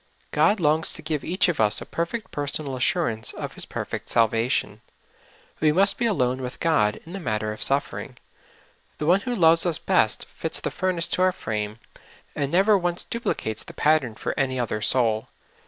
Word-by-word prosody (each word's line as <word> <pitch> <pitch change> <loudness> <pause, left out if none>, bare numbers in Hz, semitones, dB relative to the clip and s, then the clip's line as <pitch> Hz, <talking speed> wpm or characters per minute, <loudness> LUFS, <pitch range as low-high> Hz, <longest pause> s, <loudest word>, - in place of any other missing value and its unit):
God 210 0 +3
longs 155 0 +2
to 165 - -7
give 155 -2 -2
each 185 +3 +2
of 175 -4 -1
us 105 -1 +5
a - - -7
perfect 185 +5 -4
personal 145 -1 -1
assurance 125 - 0
of - - -6
His - - -6
per - - -4
fect - - -6
salvation. 115 +1 +1 0.8
We 155 - +3
must 195 +5 +3
be 240 - +2
alone 130 - 0
with 125 0 -6
God 105 -11 +2
in 170 - -10
the 195 - -5
matter 110 - -2
of 110 - -11
suffering. 140 +1 -1 0.8
The 150 - -3
One 180 +5 +4
who 245 +1 -3
loves 165 -4 +5
us 170 -3 0
best - - +1
fits - - -2
the - - -4
furnace 185 -3 +1
to 180 - 0
our 185 0 +4
frame, 105 - -4 0.6
and 140 -2 -2
never 195 +4 +4
once 175 -1 -1
duplicates 110 - -3
the - - -11
pattern 150 -7 +2
for - - -3
any 130 -1 0
other 110 -3 -2
soul. 110 -2 +1
150 Hz, 190 wpm, -24 LUFS, 120-175 Hz, 0.8 s, us